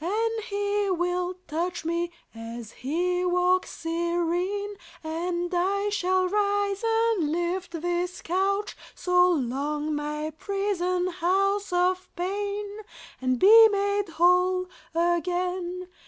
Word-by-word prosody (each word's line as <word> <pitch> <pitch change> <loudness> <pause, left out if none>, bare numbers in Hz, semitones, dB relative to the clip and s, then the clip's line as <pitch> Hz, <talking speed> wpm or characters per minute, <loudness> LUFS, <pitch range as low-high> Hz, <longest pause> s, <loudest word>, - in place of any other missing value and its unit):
And 445 +4 -1
He 405 -1 -1
will 360 0 -1
touch 335 +2 -3
me, 340 +1 -1 0.2
as 230 0 -8
He 355 +7 -1
walks 360 +1 +2
serene; 345 +4 -1 0.3
And 345 +2 -2
I 395 +3 +1
shall 370 -2 +1
rise 405 +1 0
and 450 -8 +2
lift 345 0 -2
This 350 +1 -1
couch, 395 +4 0 0.2
so 360 0 +3
long 295 +1 -1
my 300 +1 -3
prison 370 -3 -1
house 390 +3 +1
of 365 +1 +1
pain, 405 +3 -3 0.4
And 255 -1 +1
be 445 - +9
made 405 -1 0
whole 360 +2 +3 0.3
again. 360 +1 -1
360 Hz, 110 wpm, -26 LUFS, 345-400 Hz, 0.4 s, be